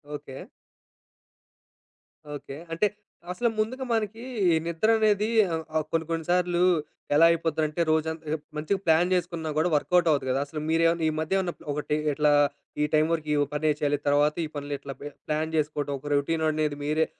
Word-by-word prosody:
Okay. 145 - -9 1.9
Okay. 140 -1 -8 0.2
అంటే 170 +6 +2 0.4
అసలు 235 +6 0
ముందుగా 255 +5 -1
మనకి 225 +1 -2 0.3
ఈ - - +4
నిద్ర 170 +6 0
అనేది 210 -1 +2 0.3
ఆహ్, 160 0 -2
ఆహ్ 155 -1 +1
కొన్ని 165 -1 0
కొన్ని 165 -1 -2
సార్లు 180 -1 +2 0.5
ఎలా 160 +3 +7
అయిపోద్దంటే 160 -1 -1
రోజంతా 160 0 0 0.2
మంచిగా 160 +6 -1
ప్లాన్ 165 +2 +4
చేసుకున్నా 170 -3 -2
కూడా 160 +3 +2
వర్కౌట్ 175 +4 +2
అవ్వదు 145 -4 +2
కదా! 130 - +1
అసలు 150 +2 -6
మీరేమన్నా 165 +1 +2
ఈ - - +3
మధ్య 160 +5 -1
ఏమన్నా 180 -2 -1 0.2
ఒకటి 150 +1 -2 0.2
ఇట్లా 150 +1 +3 0.5
ఈ - - +4
టైం 155 0 +4
వరకు 155 -2 -3
ఈ - - +1 0.2
పనే 155 +1 +1
చేయాలి, 145 -1 +1
తర్వాత 145 +1 +3
ఈ - - -5
పనులు 145 0 -4
ఇట్లా 140 -1 -7
బే 145 - -5 0.2
ప్లాన్ 155 +1 -1
చేసుకోవడం, 150 -2 -1
ఒక 145 - -10
రొటీన్ 160 +3 0
అనేది 150 -1 -1
మీరే 155 +2 +1
160 Hz, 165 wpm, -26 LUFS, 150-175 Hz, 1.9 s, ఎలా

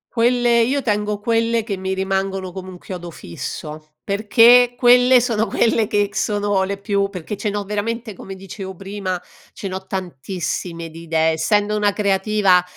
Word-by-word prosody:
Quelle 240 0 +3
io 270 +3 +1
tengo 210 -1 -1
quelle 230 +1 +1
che 210 -2 -3
mi 190 0 -3
rimangono 190 -1 -2
come 185 0 -8
un 180 - -10
chiodo 175 -1 -8
fisso, 155 - -8
perché 235 +4 +5
quelle 250 +1 +6
sono 225 -3 0
quelle 225 +1 +2
che 205 -1 +1
sono 205 -2 0
le 200 +1 -3
più 200 0 0
perché 185 +2 -6
ce 210 - -2
n'ho 205 0 -2
veramente 215 +3 -3
come 195 +1 -9
dicevo 190 0 -8
prima, 195 -1 -4 0.3
ce 195 - -6
n'ho 190 0 -6
tantissime 170 -1 -4
di 165 - -10
idee, 160 -1 +2
essendo 205 +6 +1
una 205 -1 +2
creativa, 200 -2 +2
200 Hz, 160 wpm, -20 LUFS, 185-220 Hz, 0.3 s, quelle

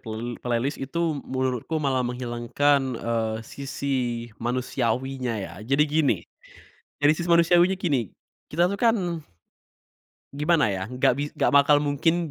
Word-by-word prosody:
pla 110 -2 -6 0.2
playlist 125 +4 -1
itu, 155 +1 -1
menurutku 130 +3 -2
malah 135 -4 +1
menghilangkan 125 +3 +1 0.2
e 115 +1 -3 0.3
sisi 130 -4 -3
manusiawinya 125 0 -1
ya. 95 -4 -6
Jadi 135 +7 +2
gini, 150 -1 +2 0.8
dari 145 +1 +5
sisi 170 +1 -4
manusiawinya 175 +2 +5
gini, 140 - 0 0.4
kita 170 +3 +3
tuh 200 - -4
kan 230 -1 +4 1.4
gimana 150 -2 +2
ya, 95 0 -4
enggak 125 0 +2
bis 145 +1 -2
enggak - - +2
bakal 145 +1 +6
mungkin 160 +3 0
140 Hz, 125 wpm, -25 LUFS, 125-155 Hz, 1.4 s, bakal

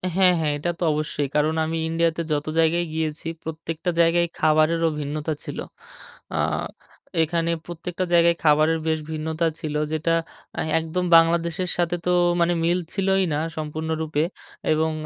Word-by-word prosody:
হ্যাঁ, 185 -1 +5
হ্যাঁ। 155 -2 +1
এটা 150 +4 -2
তো - - -2
অবশ্যই। 150 -1 -2
কারণ 150 +1 +2
আমি 165 +1 -2
ইন্ডিয়াতে 165 0 +1
যত 150 0 0
জায়গায় 165 +2 +3
গিয়েছি, 160 0 -3 0.2
প্রত্যেকটা 160 +2 -4
জায়গায় 170 +1 +3
খাবারেরও 155 +1 +3
ভিন্নতা 150 +2 -3
ছিল। - - -6 0.8
আ - - -1 0.9
এখানে 165 +1 0
প্রত্যেকটা 175 +2 -4
জায়গায় 170 0 +5
খাবারের 155 +1 +4
বেশ 160 0 +1
ভিন্নতা 160 +1 -1
ছিল 155 -3 -4 0.2
যেটা 160 +1 +1 0.4
অ্যা - - 0 0.2
একদম 165 +3 -2
বাংলাদেশের 170 +2 +2
সাথে 175 0 +1
তো 180 - +2 0.3
মানে 170 +1 +3
মিলছিলোই 190 +3 +1
না 145 - 0 0.2
সম্পূর্ণরূপে। 155 0 -2 0.5
এবং 160 +1 +1
160 Hz, 140 wpm, -23 LUFS, 155-170 Hz, 0.9 s, হ্যাঁ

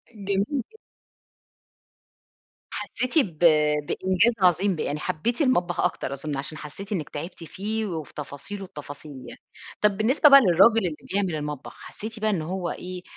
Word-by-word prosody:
جميل 200 -1 0
جدًا. 290 - -5 1.9
حسيتِ 255 +6 -1
ب 175 - 0 0.5
بإنجاز 185 +5 +2
عظيم 180 +1 +3
ب - - -5
يعني 150 +1 -2
حبيتِ 235 - -2
المطبخ 180 -10 +1
أكتر 165 -6 -1
أظن، 140 +1 -4
عشان 145 +3 -4
حسيتِ 195 +8 -8
إنك 160 -7 -2
تعبتِ 165 +3 -7
فيه، 215 +5 -3
وفي 160 -6 -6
تفاصيل 150 +8 -7
التفاصيل 150 -3 -9 0.2
يعني. - - -11 0.4
طب 210 -2 +3
بالنسبة 255 +8 +5
بقى 275 0 +10
للراجل 195 +3 +5
اللي 155 -3 -3 0.2
بيعمل 190 -4 0
المطبخ 150 -2 -5
حسيتِ 220 +1 -7
بقى 215 0 +1
إنه 165 -6 -1
هو 185 -2 -2
إيه 180 0 -6
185 Hz, 150 wpm, -25 LUFS, 155-215 Hz, 1.9 s, بقى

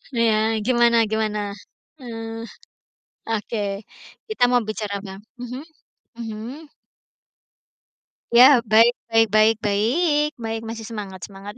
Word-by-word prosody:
Iya, 220 -1 +2
gimana 235 0 +3
gimana? 210 -2 -1 0.5
Eee, 225 -2 -7 0.9
oke 215 -1 -2 0.7
kita 435 - -1
mau 245 -1 +3
bicara 210 -1 -4
apa? 190 -1 -8 0.3
Mhm, 250 +3 -6 0.6
mhm. 235 +8 -7 1.7
Ya, 255 +2 +8
baik 225 +3 +6 0.2
baik 225 -1 +3
baik 215 +1 +5
baik, 295 - +1
baik, 225 -1 -4
masih 225 0 -6
semangat 205 -4 -7
semangat! 200 +1 -9
225 Hz, 105 wpm, -22 LUFS, 215-240 Hz, 1.7 s, Ya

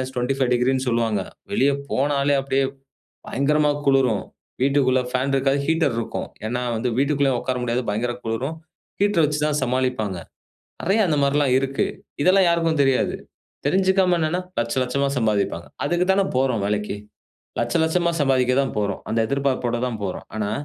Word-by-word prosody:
-25°ன்னு 130 0 +1
சொல்லுவாங்க, 115 -4 +1 0.3
வெளிய 140 -9 +3 0.2
போனாலே 140 +1 +1
அப்டியே 135 0 +1 0.6
பயங்கரமா 150 +3 +2
குளுரும். 135 -6 +3 0.4
வீட்டுக்குள்ள 135 -2 +3
ஃபேன் 130 +2 0
இருக்காது, 135 +1 +2
ஹீட்டர் 160 -6 +2
இருக்கும். 115 - -4 0.2
ஏன்னா 125 +2 -2
வந்து 115 +3 -1
வீட்டுக்குள்ளயும் 140 -2 +2
உக்கார 130 -1 -2
முடியாது, 120 +1 -1
பயங்கரமா 120 +3 -2
குளிரும் 130 +8 -2 0.4
ஹீட்டர் 205 -5 +3
வச்சி 150 0 -1
தான் 150 -1 0
சமாளிப்பாங்க. 125 -6 -1 0.6
நெறைய 195 +6 +2
அந்த 155 -3 +1
மாரில்லாம் 140 -2 +2
இருக்கு. 135 0 -1 0.4
இதெல்லாம் 185 +1 +5
யாருக்கும் 165 -3 +2
தெரியாது. 135 -1 +1 0.5
தெரிஞ்சுக்காம 185 +3 +3
என்னன்னா, 160 +3 0 0.2
1,00,000 120 +2 0
1,00,000மா 140 +3 0
சம்பாதிப்பாங்க. 105 -7 0 0.2
அதுக்கு 175 +5 +1
தானே 195 0 +2
போறோம் 130 -5 +1
வேலைக்கு. 105 0 -1 0.6
1,00,000 120 +6 +1
1,00,000மா 170 +2 +1
சம்பாதிக்க 130 -2 +2
தான் 135 - -3
போறோம், 100 -2 -2
அந்த 115 - 0
எதிர்பார்ப்போட 130 -2 0
தான் 120 -3 -3
போறோம். 95 -2 -4
ஆனா, 105 -1 -1
135 Hz, 140 wpm, -22 LUFS, 120-150 Hz, 0.6 s, இதெல்லாம்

